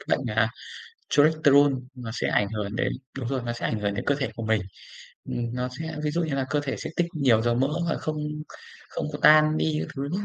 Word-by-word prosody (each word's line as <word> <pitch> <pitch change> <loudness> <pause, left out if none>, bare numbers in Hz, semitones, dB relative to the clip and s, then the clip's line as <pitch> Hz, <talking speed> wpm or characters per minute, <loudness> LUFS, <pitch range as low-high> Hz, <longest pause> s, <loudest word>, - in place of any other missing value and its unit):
cái - - -14
bệnh, 135 - -5
à, 115 0 +4 0.6
Cholesterol 145 -2 +5 0.2
nó 120 -3 -6
sẽ - - -1
ảnh 100 -1 +2
hưởng 105 -1 -3
đến - - 0 0.3
đúng 125 -3 -3
rồi, 130 -1 -1
nó 120 - -2
sẽ 120 - -4
ảnh 110 - -1
hưởng 100 -1 -1
đến - - -4
cơ 145 - +2
thể 135 -4 -2
của 115 - -5
mình. 110 -2 +2 0.6
Ừm, 120 0 -3
nó 125 0 -2
sẽ 160 -1 -4
ví 150 - +1
dụ 170 +3 0
như 155 -4 -1
là 135 -1 -1
cơ 150 - +2
thể 140 -2 -3
sẽ - - -5
tích 175 - +2
nhiều 125 -7 +3
dầu 120 0 +2
mỡ 130 +3 +2 0.2
và - - 0
không 155 0 -3 0.7
không - - -4
có 145 - -4
tan 155 0 +7
đi 155 -1 +1
các - - -5
thứ 135 - -3 0.2
ấy. 205 - -3
135 Hz, 250 wpm, -26 LUFS, 115-150 Hz, 0.7 s, tan